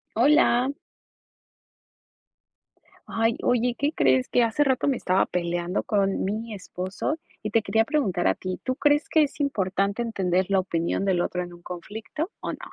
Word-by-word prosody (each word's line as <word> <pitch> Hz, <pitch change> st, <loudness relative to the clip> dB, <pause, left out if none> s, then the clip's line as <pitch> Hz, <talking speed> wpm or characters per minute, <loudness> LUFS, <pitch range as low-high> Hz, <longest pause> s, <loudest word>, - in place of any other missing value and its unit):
Hola. 260 Hz, 0 st, +4 dB, 2.3 s
Ay, 225 Hz, 0 st, +1 dB
oye, 245 Hz, 0 st, +2 dB
¿qué 285 Hz, +2 st, +1 dB
crees? 130 Hz, -, +2 dB
Que 245 Hz, -, +3 dB
hace 230 Hz, +6 st, +2 dB
rato 265 Hz, -2 st, +1 dB
me 275 Hz, -, +2 dB
estaba 185 Hz, -4 st, +2 dB
peleando 175 Hz, +1 st, -2 dB
con 195 Hz, -2 st, +1 dB
mi 220 Hz, +3 st, -3 dB
esposo, 190 Hz, -, -4 dB, 0.2 s
y 215 Hz, -, -3 dB
te 225 Hz, -, +3 dB
quería 225 Hz, +1 st, +2 dB
preguntar 230 Hz, -, 0 dB
a -, -, +3 dB
ti, 185 Hz, -1 st, -5 dB
¿tú 255 Hz, -, -1 dB
crees 290 Hz, +2 st, +2 dB
que 315 Hz, -, +5 dB
es 295 Hz, +1 st, -3 dB
importante 200 Hz, -5 st, 0 dB
entender 190 Hz, -5 st, 0 dB
la 195 Hz, -1 st, +3 dB
opinión 170 Hz, 0 st, -1 dB
del 190 Hz, -3 st, +2 dB
otro 180 Hz, 0 st, -2 dB
en 175 Hz, -, -9 dB
un 175 Hz, -, -14 dB
conflicto, 215 Hz, -, -6 dB
o -, -, -4 dB
no? -, -, -9 dB
210 Hz, 165 wpm, -25 LUFS, 185-250 Hz, 2.3 s, que